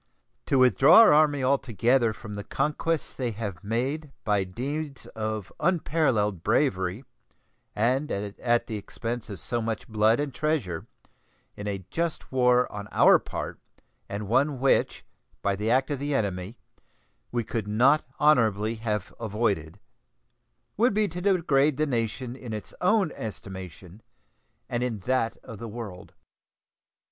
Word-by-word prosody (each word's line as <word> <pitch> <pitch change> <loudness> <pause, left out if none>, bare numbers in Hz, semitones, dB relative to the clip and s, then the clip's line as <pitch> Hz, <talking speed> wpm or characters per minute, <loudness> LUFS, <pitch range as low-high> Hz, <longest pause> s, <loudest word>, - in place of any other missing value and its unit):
To 135 - +2
withdraw 130 - +7
our 225 - +7
Army 150 -2 +4
altogether 125 -2 +2
from 110 0 -9
the 100 0 -5
conquests 150 +6 -1
they 125 -2 -2
have 100 -5 -6
made 135 +8 -2
by 105 -2 +2
deeds 140 +9 -5
of 110 -2 -5
unparalleled 135 - +1
bravery, 95 - +1 0.7
and 130 +7 +1
at 105 +4 -1
the 110 - -4
expense 115 +3 -5
of 100 -4 -7
so 120 +8 -2
much 110 -1 -3
blood 110 +2 +3
and 145 -2 -2
treasure, 125 - -2 0.7
in 105 - -6
a 95 -3 -4
just 170 -1 -3
war 125 -1 +4
on 105 0 -6
our - - +6
part, - - -6 0.5
and 100 0 -4
one 135 +6 +2
which, 135 +1 +1 0.4
by 100 -1 +1
the 105 +3 -2
act 130 +5 +2
of 140 - -2
the 145 0 -1
enemy, 100 -1 -2 0.7
we 120 -1 0
could 110 -1 -3
not 125 +8 +4 0.2
honorably 115 -7 +3
have 105 -3 -3
avoided, 105 -6 -1 1.0
would 230 0 +3
be 215 -1 +3
to 175 +2 -6
degrade 155 -7 +2
the 155 - +2
nation 120 -1 -2
in 125 -4 -7
its 105 - -7
own 195 -2 +3
estimation 95 -2 -8 0.7
and 120 0 -2
in 120 -5 -2
that 125 +1 0
of 115 -5 -10
the 115 - -6
world. 105 -5 -8
120 Hz, 140 wpm, -27 LUFS, 105-140 Hz, 1.0 s, withdraw